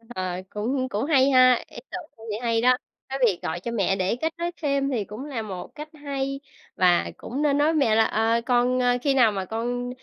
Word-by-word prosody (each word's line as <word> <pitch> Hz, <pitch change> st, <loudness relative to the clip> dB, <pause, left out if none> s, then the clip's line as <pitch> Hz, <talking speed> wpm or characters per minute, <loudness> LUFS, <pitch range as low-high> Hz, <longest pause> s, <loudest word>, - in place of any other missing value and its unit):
Ờ, 185 Hz, -1 st, -3 dB
cũng 255 Hz, +5 st, -2 dB
cũng 215 Hz, +4 st, -2 dB
hay 275 Hz, -3 st, +4 dB
ha, 255 Hz, -2 st, +5 dB
ý -, -, -14 dB
tưởng 360 Hz, -, -4 dB, 0.2 s
có 225 Hz, -, -15 dB
vẻ 210 Hz, -, -2 dB
hay 230 Hz, -1 st, +1 dB
đó! 250 Hz, +1 st, +4 dB, 0.3 s
Cái 270 Hz, +1 st, -3 dB
việc 195 Hz, -7 st, +1 dB
gọi 165 Hz, -, -3 dB
cho 235 Hz, +7 st, -5 dB
mẹ 195 Hz, -4 st, +1 dB
để 190 Hz, +3 st, 0 dB
kết 320 Hz, +6 st, -2 dB
nối 345 Hz, +1 st, -2 dB
thêm 280 Hz, -2 st, +1 dB
thì 220 Hz, -6 st, -1 dB
cũng 215 Hz, +7 st, -8 dB
là 270 Hz, -6 st, -4 dB
một 190 Hz, -5 st, -6 dB
cách 300 Hz, +1 st, -8 dB
hay, 275 Hz, -2 st, -4 dB, 0.4 s
và 180 Hz, -2 st, +3 dB
cũng 265 Hz, +5 st, -5 dB
nên 290 Hz, -2 st, +2 dB
nói 290 Hz, +1 st, +3 dB
với 325 Hz, -, +2 dB
mẹ 270 Hz, -8 st, +3 dB
là: 225 Hz, -, +5 dB
"Ờ, 225 Hz, +2 st, +1 dB
con 250 Hz, 0 st, +2 dB
a, 245 Hz, 0 st, +3 dB
khi 275 Hz, +3 st, +1 dB
nào 240 Hz, -5 st, +5 dB
mà 195 Hz, -2 st, -3 dB
con 245 Hz, +3 st, -3 dB
245 Hz, 240 wpm, -25 LUFS, 215-275 Hz, 0.4 s, ha